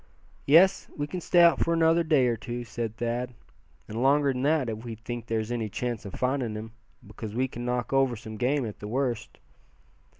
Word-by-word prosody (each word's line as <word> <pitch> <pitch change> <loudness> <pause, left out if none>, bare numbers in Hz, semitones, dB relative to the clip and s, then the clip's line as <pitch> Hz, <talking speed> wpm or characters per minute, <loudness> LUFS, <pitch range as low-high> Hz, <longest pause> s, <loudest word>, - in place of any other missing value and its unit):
"Yes, 170 +7 +5
we 145 - -1
can 180 +4 -5
stay 175 +1 +4
out 170 - +6
for 170 - +2
another 165 +1 +4
day 150 -5 +3
or 120 -1 +2
two," 120 +2 -5
said 115 -1 -5
Thad, 120 +1 -2 0.5
"and 110 +2 -4
longer 140 +1 +3
than 125 - -3
that, 145 -1 +2
if 110 0 -4
we 115 -2 -6
think 115 +1 -7
there's 110 0 -2
any 115 -3 -2
chance 120 +1 -3
of 100 - -7
finding 125 -4 -1
him; 110 +1 -7 0.3
because 105 +1 -8
we 130 +2 +1
could 120 - -8
knock 125 +1 -2
over 135 -2 +3
some 110 0 -8
game 130 +3 +1
at 105 - -7
the 105 - -7
worst." 120 -1 -2
120 Hz, 205 wpm, -27 LUFS, 115-140 Hz, 0.5 s, out